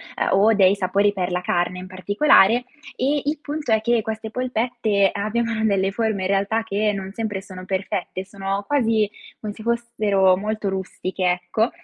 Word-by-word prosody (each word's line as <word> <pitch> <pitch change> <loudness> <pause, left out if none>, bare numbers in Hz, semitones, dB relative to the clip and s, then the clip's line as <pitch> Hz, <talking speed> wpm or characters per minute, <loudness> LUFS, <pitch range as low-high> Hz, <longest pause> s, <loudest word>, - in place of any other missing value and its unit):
ehm, - - 0
o 210 +3 +5
dei 195 -2 +5
sapori 200 +1 +1
per 180 -2 -2
la 180 0 -1
carne 180 0 -1
in 180 - -7
particolare. 205 - +4 0.3
E 280 +3 0
il 295 +1 -1
punto 295 -3 -4
è 220 -1 +4
che 235 0 +2
queste 220 0 -5
polpette 235 -5 0
abbiano 220 +2 -1
delle 195 -2 +2
forme 220 -2 -1
in - - 0
realtà 200 +3 +1
che 210 0 0
non 195 -1 -5
sempre 210 -3 -3
sono 185 -2 -10
perfette, 190 0 -3
sono 195 0 -3
quasi 225 -7 +2 0.3
come 210 -1 -5
se 220 - -12
fossero 215 -5 +2
molto 215 +1 -2
rustiche, 190 -1 -2
ecco; 200 +6 0
205 Hz, 170 wpm, -22 LUFS, 190-225 Hz, 0.3 s, o